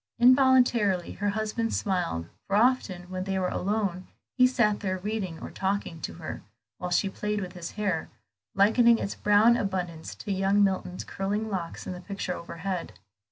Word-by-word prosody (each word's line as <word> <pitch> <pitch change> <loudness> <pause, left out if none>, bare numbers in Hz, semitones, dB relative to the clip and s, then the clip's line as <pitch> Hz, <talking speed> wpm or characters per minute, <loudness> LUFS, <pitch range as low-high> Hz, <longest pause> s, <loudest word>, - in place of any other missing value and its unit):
Involuntarily 245 -7 +4
her 205 +1 -1
husband 220 +2 -1
smiled; 175 - -1 0.2
for 195 - 0
often 215 -6 +2
when 185 0 -3
they 195 -1 -1
were 185 -1 0
alone 195 -2 -1 0.3
he 255 -1 +6
sat 215 -5 +2
there 185 -2 -2
reading 190 -3 -3
or - - -7
talking 190 -4 -2
to - - -5
her, 165 -2 -6 0.4
while 180 - -3
she 180 +3 +2
played 210 +2 -2
with 180 -2 -5
his 175 -2 -7
hair, 195 -6 -1 0.5
likening 230 +4 +5
its 200 - -3
brown 210 +3 +5
abundance 180 -6 -3
to 210 - -6
young 195 +1 +3
Milton's 190 -2 -1
curling 205 +3 -3
locks 175 -4 -4
in - - -4
the 180 - -8
picture 195 -1 -4
overhead. 170 - -5
195 Hz, 165 wpm, -27 LUFS, 180-215 Hz, 0.5 s, he